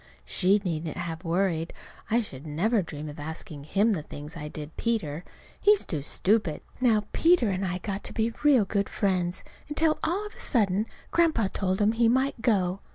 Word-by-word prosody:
She 190 - +3
needn't 160 -2 -3
have 170 -2 -4
worried. 170 -1 0 0.4
I 230 +2 +3
should 145 - -9
never 200 +9 +1
dream 155 -3 -7
of 150 0 -8
asking 155 -1 -6
him 205 +8 +2
the 185 -7 0
things 150 +1 -9
I 150 -2 -6
did 150 0 -8
Peter. 175 -9 -1 0.4
He's 415 -1 +4
too 155 -4 -3
stupid. 185 +2 +1 0.2
Now 225 -5 +3
Peter 330 - +4
and 190 +1 -2
I 180 -1 -1
got 195 +2 -4
to - - -3
be 225 +1 0
real 270 -8 +5
good 200 0 -1
friends 185 -3 0 0.3
until 310 +1 +2
all 365 +6 0
of 420 - -8
a - - -16
sudden 210 -3 +1 0.2
Grandpa 320 - +3
told 190 -1 0
him 210 +1 +4
he 230 0 +3
might 260 0 +1
go. 195 -6 +2
195 Hz, 185 wpm, -27 LUFS, 165-230 Hz, 0.4 s, real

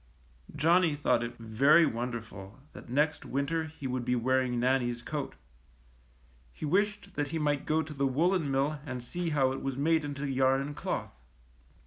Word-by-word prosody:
'^ - - -12
Johnnie 165 +1 +3
thought 145 -5 +2
it 120 0 -5
very 135 +9 +4
wonderful 115 -5 -5 0.2
that - - -12
next 150 +5 +1
winter 150 +4 -1
he 155 -3 -10
would 130 -1 -2
be 125 +1 +1
wearing 125 0 +1
Nannie^s 120 -1 0
coat. 150 -3 -4 1.2
He - - -6
wished 200 +4 0
that 145 -3 -1
he 165 +3 -3
might 145 -2 0
go 160 +1 +2
to 155 0 -8
the 140 -1 0
woolen 165 +4 +1
mill 140 +3 0
and 130 -4 -6
see 175 +7 -3
how 135 -4 +2
it 135 - -4
was 135 -1 -3
made 160 +2 +2
into 145 0 -4
yarn 135 0 +2
and 145 +1 -5
cloth. - - -3
140 Hz, 175 wpm, -30 LUFS, 125-155 Hz, 1.2 s, very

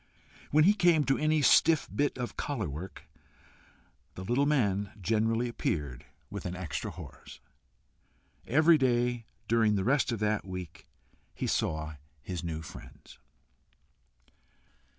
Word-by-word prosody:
When 155 +1 +5
he 200 +5 +6
came 175 -6 +4
to 135 -1 +1
any 155 -1 +2
stiff 160 +2 +5
bit 145 -2 0
of 125 -1 -4
collar 145 - -3
work, 80 +7 -7 1.1
the 95 - -7
little 125 +8 +1
man 105 -9 +1
generally 115 +4 +1
appeared 75 - -3 0.2
with - - -5
an 90 - -5
extra 90 -5 -4
horse. - - -11 1.1
Every 155 +5 +5
day 120 -2 +1 0.2
during 110 -2 +3
the 95 - 0
rest 135 +3 +2
of 115 - -1
that 105 0 0
week 90 -3 -8 0.5
he - - -3
saw 80 -1 -1 0.3
his 90 -1 -5
new 80 -1 -4
friends. - - -13
115 Hz, 130 wpm, -30 LUFS, 90-140 Hz, 1.1 s, he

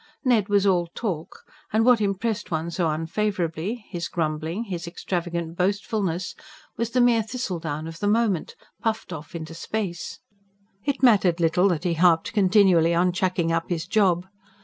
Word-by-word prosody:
Ned 225 -5 +3
was 200 -1 +3
all 180 -3 +3
talk; 180 -9 -4 0.3
and 220 +1 +3
what 245 -3 +5
impressed 210 +2 -1
one 160 0 -2
so 170 -1 0
unfavourably 180 +5 -2
his 170 -3 -4
grumbling, 160 +4 -2
his 175 -6 -5
extravagant 170 -1 -3
boastfulness 190 -1 -1 0.4
was 230 -1 -2
the 250 - 0
mere 240 -2 +4
thistledown 175 - -4
of 165 0 -8
the 205 - -1
moment, 210 -5 +1 0.3
puffed 225 -5 -2
off 155 +1 -9
into 160 -1 -6
space. 175 0 -4 0.7
It 280 -2 -1
mattered 195 -8 +5
little 175 +3 +3
that 170 -4 0
he 175 -2 +1
harped 165 +1 +3
continually 185 -5 +4
on 180 +1 +3
"chucking 180 -2 0
up" 165 0 -1
his 170 -2 -2
job. 185 -3 +2
180 Hz, 155 wpm, -24 LUFS, 165-210 Hz, 0.7 s, what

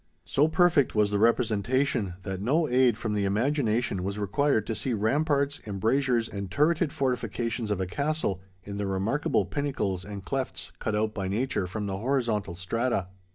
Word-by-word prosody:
So 140 - +3
perfect 160 -6 +3
was 105 -1 +3
the 100 - +1
representation, 115 -2 +1
that 95 -1 -4
no 150 +9 +2
aid 125 -1 +3
from 110 -2 -2
the 105 -1 0
imagination 115 -1 +1
was 100 +2 -3
required 110 +3 +1
to 115 - -2
see 120 +4 -1
ramparts, 140 +6 +1
embrasures, 115 +4 +1
and 100 -1 -5
turreted 155 - +2
fortifications 120 -3 -1
of 105 -2 0
a 95 - 0
castle, 140 - -1 0.2
in 100 0 -6
the 100 -1 -2
remarkable 100 +9 0
pinnacles 115 -10 -2
and 100 0 -8
clefts 135 +2 -3
cut 110 -3 -1
out 110 0 0
by 100 -3 -3
nature 105 -1 -1
from 105 +3 -4
the 95 -1 -3
horizontal 115 -7 0
strata. 95 +1 -1
110 Hz, 165 wpm, -27 LUFS, 100-135 Hz, 0.2 s, So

